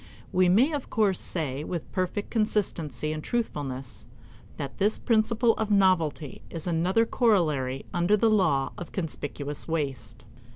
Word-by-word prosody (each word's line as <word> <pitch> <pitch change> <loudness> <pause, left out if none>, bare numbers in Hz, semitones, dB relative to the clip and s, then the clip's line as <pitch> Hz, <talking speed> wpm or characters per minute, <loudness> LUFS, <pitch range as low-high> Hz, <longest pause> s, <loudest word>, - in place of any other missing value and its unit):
We 185 0 +4
may 240 - +4
of 285 -3 -4
course 205 -4 +2
say, 150 -4 -3
with 170 0 -5
perfect 185 +2 -2
consistency 185 -9 0
and 155 0 -5
truthfulness, 140 - -4 0.5
that 140 - -6
this 205 +2 +2
principle 230 0 +2
of 220 -1 -1
novelty 180 -7 +2
is 165 -2 -6
another 180 +6 +2
corollary 155 - +1
under 175 +4 +3
the 220 +2 +3
law 160 -10 +2
of 175 - -7
conspicuous 145 -4 -5
waste. 135 -10 -3
175 Hz, 135 wpm, -27 LUFS, 145-210 Hz, 0.5 s, We